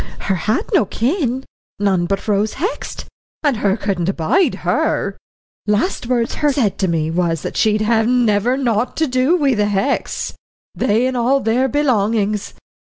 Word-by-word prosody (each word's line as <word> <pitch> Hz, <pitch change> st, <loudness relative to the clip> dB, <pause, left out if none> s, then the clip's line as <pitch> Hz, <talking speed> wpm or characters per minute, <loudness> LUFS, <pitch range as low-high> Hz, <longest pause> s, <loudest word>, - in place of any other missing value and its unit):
"Her 195 Hz, -, 0 dB
had 195 Hz, +5 st, 0 dB
no -, -, +4 dB
kin 260 Hz, -, -1 dB, 0.3 s
none 190 Hz, -4 st, +1 dB
but 195 Hz, +3 st, -2 dB
Rose 210 Hz, +1 st, +1 dB
Hext, 385 Hz, -, -4 dB, 0.4 s
and 285 Hz, -6 st, +2 dB
her 200 Hz, 0 st, +1 dB
couldn't 190 Hz, -4 st, -1 dB
abide 195 Hz, -, +1 dB
her. -, -, 0 dB, 0.5 s
Last 215 Hz, -, 0 dB
words 240 Hz, -2 st, 0 dB
her 295 Hz, -1 st, +3 dB
said 215 Hz, -8 st, 0 dB
to 190 Hz, -, +1 dB
me 160 Hz, -2 st, 0 dB
was 165 Hz, -2 st, 0 dB
that -, -, -5 dB
she'd 215 Hz, -1 st, +2 dB
'have 220 Hz, 0 st, +2 dB
never 240 Hz, 0 st, +2 dB
naught 240 Hz, -3 st, 0 dB
to 320 Hz, -, +2 dB
do 260 Hz, +4 st, +2 dB
wi' 280 Hz, -5 st, +2 dB
the 210 Hz, -2 st, +1 dB
Hexts, 205 Hz, +7 st, -1 dB, 0.4 s
they 220 Hz, +4 st, +1 dB
and 260 Hz, 0 st, -1 dB
all 250 Hz, +3 st, +2 dB
their 245 Hz, +2 st, +1 dB
belongings.'" 215 Hz, -7 st, 0 dB
225 Hz, 160 wpm, -18 LUFS, 200-260 Hz, 0.5 s, no